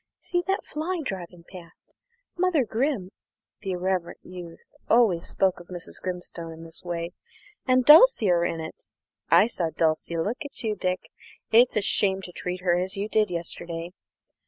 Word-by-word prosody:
See 350 -1 -1
that 385 0 0
fly 335 +4 -3
driving 175 -5 -6
past? 175 -3 -13 0.4
Mother 350 -7 +2
Grim" 225 -4 -1 0.5
(the 195 -3 -3
irreverent 180 -1 -2
youth 175 -2 -11 0.2
always 220 -8 +4
spoke 190 -2 +1
of 175 - -13
Mrs. 175 -1 -8
Grimstone 175 -2 -5
in 160 +1 -11
this 165 0 -9
way) 170 -1 -4 0.6
"and 255 -1 +4
Dulcie 300 - +8
are 170 -1 +3
in 165 -1 -1
it. 160 0 -9 0.4
I - - +7
saw 180 -8 -2
Dulcie 160 +1 0
look 220 - -2
at 285 -3 -5
you, 215 -2 0
Dick. 180 -4 -3 0.4
It's 240 +3 +5
a - - +3
shame 195 -1 +2
to 180 - -8
treat 180 +1 -5
her 175 -1 +2
as 190 +2 -2
you 205 +2 -2
did 215 -2 +2
yesterday. 170 0 -5
185 Hz, 165 wpm, -26 LUFS, 170-225 Hz, 0.6 s, Dulcie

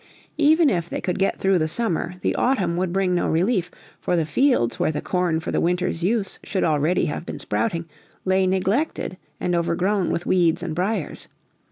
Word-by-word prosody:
Even 310 0 +5
if 170 -3 -1
they - - -3
could 180 - -2
get 195 - +1
through 190 -2 +2
the 155 - +1
summer, 180 -2 -1
the - - +1
autumn 195 -10 +1
would 180 0 -1
bring 190 -1 +1
no 175 - +1
relief, 180 +2 +1 0.3
for 180 - 0
the 165 -2 +1
fields, 155 - +2
where - - +2
the 150 - -3
corn 180 -3 0
for 160 - -5
the - - 0
winter's 175 -1 0
use 200 +1 0
should 195 - -1
already 155 +3 +2
have - - -3
been - - -6
sprouting, 170 -7 -2 0.4
lay 190 0 +2
neglected 190 - 0 0.2
and 180 - -1
overgrown 180 +3 +1
with 170 - -2
weeds 175 -3 +2
and - - -3
briers. 185 0 -2
180 Hz, 190 wpm, -23 LUFS, 170-195 Hz, 0.4 s, Even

